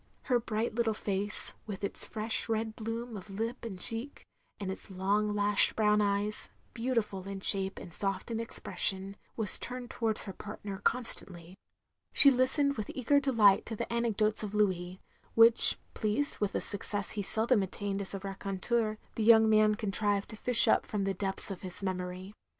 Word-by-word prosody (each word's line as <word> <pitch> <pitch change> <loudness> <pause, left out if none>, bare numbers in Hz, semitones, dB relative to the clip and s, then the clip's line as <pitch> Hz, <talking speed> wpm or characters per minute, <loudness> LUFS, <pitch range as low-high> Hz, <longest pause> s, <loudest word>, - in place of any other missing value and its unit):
Her 245 -2 +1
bright 225 0 -3
little 225 -1 0
face 205 0 0
— - - -20
^with 200 -1 -6
its 200 - -4
fresh 220 0 -2
red 220 0 -2
bloom 230 +1 -5
of 200 0 -9
lip 225 +6 -4
and 200 -6 -7
cheek, 230 +8 -2 0.3
and 195 -2 -4
its 190 - -3
long 200 +3 -1
lashed 205 0 +3
brown 210 -1 +2
eyes, 205 +1 -1 0.2
beautiftd 230 -6 -2
in 195 0 -6
shape 195 -1 +5
and 170 - -10
soft 195 +4 -3
in 225 - -2
expression 195 -3 -2
— - - -40
^was 220 -3 +4
turned 250 -1 -7
towards 220 -2 -2
her 195 - -8
partner 205 -1 -8
constantly. 185 -7 -2 0.6
She 280 - +8
listened 270 +2 +1
with 215 - -5
eager 280 +3 +2
deKght 220 -8 +4
to 225 - -5
the 225 - -5
anecdotes 220 -2 +3
of 210 -1 -5
Louis; 185 -3 -1 0.4
which, 230 0 +6 0.2
pleased 220 +7 0
with 205 -2 -2
a - - 0
success 205 0 -2
he 210 - -3
seldom 220 +3 +1
attained 195 +1 -4
as 200 0 -6
a - - -4
raconteur, 200 +3 -2 0.2
the 225 - -3
young 220 0 +6
man 215 0 +4
contrived 205 -1 0
to 220 - -8
fish 235 +2 +4
up - - +2
from 205 -2 -2
the 195 0 -1
depths 195 +1 0
of 190 - -7
his 185 +1 -7
memory. 185 +1 -5
210 Hz, 180 wpm, -30 LUFS, 195-230 Hz, 0.6 s, She